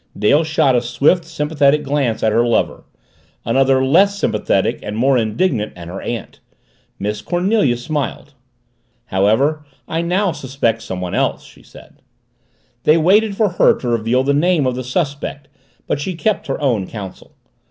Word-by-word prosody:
Dale 145 Hz, +9 st, +3 dB
shot 155 Hz, -4 st, +2 dB
a 120 Hz, -, +3 dB
swift, 140 Hz, +8 st, +1 dB
sympathetic 150 Hz, -2 st, +1 dB
glance 140 Hz, -5 st, -1 dB
at 110 Hz, -, +3 dB
her 115 Hz, +2 st, +3 dB
lover, 120 Hz, -1 st, 0 dB, 0.6 s
another 130 Hz, +3 st, +2 dB
less 195 Hz, +9 st, +3 dB
sympathetic 105 Hz, -, 0 dB
and 105 Hz, +1 st, -5 dB
more 135 Hz, +3 st, +3 dB
indignant 110 Hz, -, 0 dB
at 85 Hz, -1 st, -9 dB
her 95 Hz, -, -7 dB
aunt. 115 Hz, -3 st, -6 dB, 0.6 s
Miss 105 Hz, +1 st, -3 dB
Cornelia 175 Hz, -, +1 dB
smiled. 145 Hz, +2 st, -4 dB, 0.7 s
"However, 120 Hz, +11 st, +1 dB, 0.2 s
I 165 Hz, -, -2 dB
now 180 Hz, +3 st, 0 dB
suspect 125 Hz, -6 st, -2 dB
somebody 90 Hz, -4 st, -4 dB
else," -, -, 0 dB
she -, -, -17 dB
said. -, -, -17 dB, 0.8 s
They 155 Hz, -, +4 dB
waited 200 Hz, +5 st, +3 dB
for 215 Hz, -2 st, +2 dB
her 180 Hz, -, +3 dB
to 125 Hz, -, -4 dB
reveal 115 Hz, +2 st, +1 dB
the 140 Hz, +1 st, +1 dB
name 160 Hz, 0 st, +2 dB
of 130 Hz, -, 0 dB
the 130 Hz, +1 st, -5 dB
suspect 145 Hz, +1 st, -3 dB, 0.4 s
but -, -, -2 dB
she 180 Hz, +5 st, -4 dB
kept 195 Hz, 0 st, -1 dB
her 135 Hz, -, -3 dB
own 115 Hz, -10 st, 0 dB
counsel. 100 Hz, -4 st, -9 dB
135 Hz, 155 wpm, -18 LUFS, 115-160 Hz, 0.8 s, They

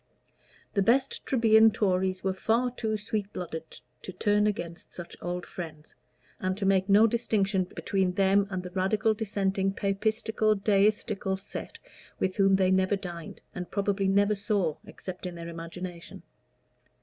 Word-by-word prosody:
The 200 Hz, -, +2 dB
best 260 Hz, +6 st, +2 dB
Trebian 225 Hz, -3 st, +6 dB
Tories 185 Hz, -3 st, 0 dB
were 190 Hz, -1 st, +1 dB
far 230 Hz, +6 st, +1 dB
too 220 Hz, -3 st, -2 dB
sweet 210 Hz, -1 st, -3 dB
blooded 160 Hz, -2 st, -7 dB, 0.2 s
to -, -, -7 dB
turn 205 Hz, +3 st, +2 dB
against 170 Hz, -5 st, -4 dB
such 175 Hz, -1 st, -8 dB
old 175 Hz, +1 st, -3 dB
friends, 155 Hz, -3 st, -8 dB, 0.5 s
and 185 Hz, 0 st, -1 dB
to 200 Hz, -, -2 dB
make 190 Hz, 0 st, +2 dB
no 205 Hz, +3 st, +7 dB
distinction 210 Hz, -4 st, +1 dB
between 185 Hz, 0 st, -1 dB
them 195 Hz, +1 st, +3 dB
and 185 Hz, -2 st, -3 dB
the 180 Hz, -, -7 dB
Radical, 195 Hz, +4 st, +1 dB
Dissenting, 195 Hz, -2 st, -1 dB
Papistical, 215 Hz, +2 st, 0 dB
Deistical 200 Hz, -1 st, +1 dB
set 195 Hz, -, -8 dB, 0.4 s
with 185 Hz, -1 st, -1 dB
whom 195 Hz, -1 st, +5 dB
they 190 Hz, -1 st, +3 dB
never 190 Hz, +1 st, +3 dB
dined, 175 Hz, -4 st, -8 dB
and 180 Hz, -2 st, -6 dB
probably 200 Hz, -1 st, 0 dB
never 200 Hz, +2 st, +3 dB
saw 195 Hz, -6 st, 0 dB
except 185 Hz, -3 st, -7 dB
in 175 Hz, -, -7 dB
their 170 Hz, 0 st, -7 dB
imagination. 170 Hz, +1 st, -8 dB
195 Hz, 150 wpm, -28 LUFS, 185-210 Hz, 0.5 s, no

